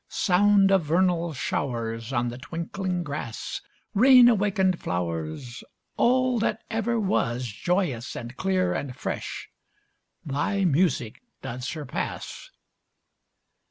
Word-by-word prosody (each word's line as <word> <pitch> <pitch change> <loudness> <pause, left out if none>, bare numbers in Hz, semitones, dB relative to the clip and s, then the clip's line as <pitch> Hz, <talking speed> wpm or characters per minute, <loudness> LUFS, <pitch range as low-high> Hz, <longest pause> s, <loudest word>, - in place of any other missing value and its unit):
Sound 195 +1 +4
of 190 -3 +4
vernal 170 +1 +2
showers 115 -5 -3
On 120 -2 0
the 120 +1 -7
twinkling 175 +4 -3
grass, 145 -7 -5 0.3
Rain 250 +3 +8
awaken'd 195 -4 +2
flowers, 85 +6 -4 0.3
All 255 0 +3
that 220 0 -1
ever 225 +1 0
was, 125 - 0
Joyous 130 - -1
and 120 +2 -7
clear 185 +1 +1
and 130 -3 -4
fresh, - - -5 0.8
thy 165 +8 0
music 155 -8 +1 0.2
doth 125 +1 -5
surpass. 145 0 -5
170 Hz, 105 wpm, -26 LUFS, 120-195 Hz, 0.8 s, Rain